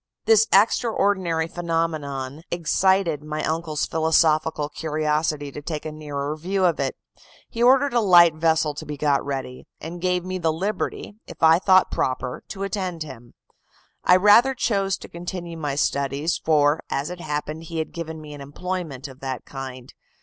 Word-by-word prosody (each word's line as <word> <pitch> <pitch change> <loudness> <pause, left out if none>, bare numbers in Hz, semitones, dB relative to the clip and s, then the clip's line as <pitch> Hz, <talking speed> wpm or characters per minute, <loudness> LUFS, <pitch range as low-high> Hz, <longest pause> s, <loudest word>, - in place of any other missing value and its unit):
"This 220 -1 +5
extraordinary 195 -6 +2
phenomenon 160 -5 -3
excited 175 -1 +1
my 155 0 -4
uncle's 160 -1 -1
philosophical 160 -1 +2
curiosity 150 -1 -1
to 150 - -8
take 155 0 -5
a 155 - -4
nearer 150 -1 -4
view 185 +4 -1
of 175 - +2
it. - - -1 0.6
He 230 - -4
ordered 265 +2 +5
a 240 - +4
light 175 -6 +6
vessel 160 -1 +1
to 155 +2 -8
be 150 -1 -5
got 145 -1 +1
ready, 135 -2 -5
and 170 +2 -7
gave 180 -1 0
me 185 0 -3
the 165 -2 +1
liberty, 200 +4 -3
if - - -10
I 160 +1 +7
thought 185 -1 +4
proper, 130 -1 -2
to 195 -1 -6
attend 185 -5 -3
him. 120 -5 -12 0.7
I 180 - +6
rather 210 +8 +6
chose 195 -5 0
to - - -11
continue 175 0 -6
my 150 -4 -3
studies, 140 +3 0
for, 150 -1 +3
as 140 +5 -2
it 180 - -7
happened, 150 +2 -4
he 165 0 -6
had 160 - -3
given 160 -1 -6
me 150 -1 -10
an 145 - -9
employment 150 -1 -5
of 130 -1 -13
that 130 -2 -5
kind. 130 -2 -8
160 Hz, 165 wpm, -23 LUFS, 150-180 Hz, 0.7 s, I